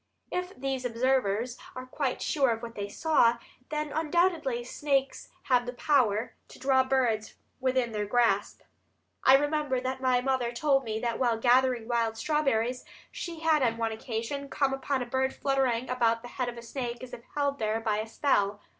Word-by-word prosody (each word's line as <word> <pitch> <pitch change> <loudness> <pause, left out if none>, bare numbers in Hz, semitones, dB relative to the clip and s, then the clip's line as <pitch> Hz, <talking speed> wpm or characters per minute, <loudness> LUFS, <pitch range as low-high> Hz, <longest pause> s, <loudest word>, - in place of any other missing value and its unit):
If 360 +1 -3
these 265 0 -3
observers 245 -1 0 0.2
are 255 0 -6
quite 260 0 -2
sure 275 -4 +2
of 225 0 -1
what 230 -1 -6
they 205 -2 -5
saw, 240 -3 +3 0.3
then 300 -1 -2
undoubtedly 315 -5 +1
snakes 275 +1 -1
have 245 -1 +2
the 245 - -3
power 245 -5 +1
to - - -14
draw 265 0 +3
birds 245 -5 0 0.2
within 255 -2 +1
their 210 -1 -2
grasp. 210 -3 +1 0.6
I 265 - +8
remember 290 -2 +1
that 260 +1 -3
my 255 -1 +3
mother 255 -2 0
told 270 +1 +2
me 220 -1 -2
that 235 -2 -2
while 240 -3 +2
gathering 245 -1 +3
wild 230 -2 0
strawberries 255 -3 0 0.3
she 335 -3 -6
had 320 -2 +3
on 230 -3 +1
one 225 -1 -1
occasion 235 +5 -4
come 275 -1 +1
upon 270 -1 -1
a - - -6
bird 265 +2 -1
fluttering 260 -3 0
about 230 -2 +1
the 245 - -8
head 250 -1 -2
of 240 - -8
a 235 - -8
snake 240 0 -5
as 255 - -9
if - - -7
held 285 -1 0
there 220 0 0
by 220 -2 0
a 215 - -3
spell. 205 -5 +1
255 Hz, 180 wpm, -29 LUFS, 230-275 Hz, 0.6 s, I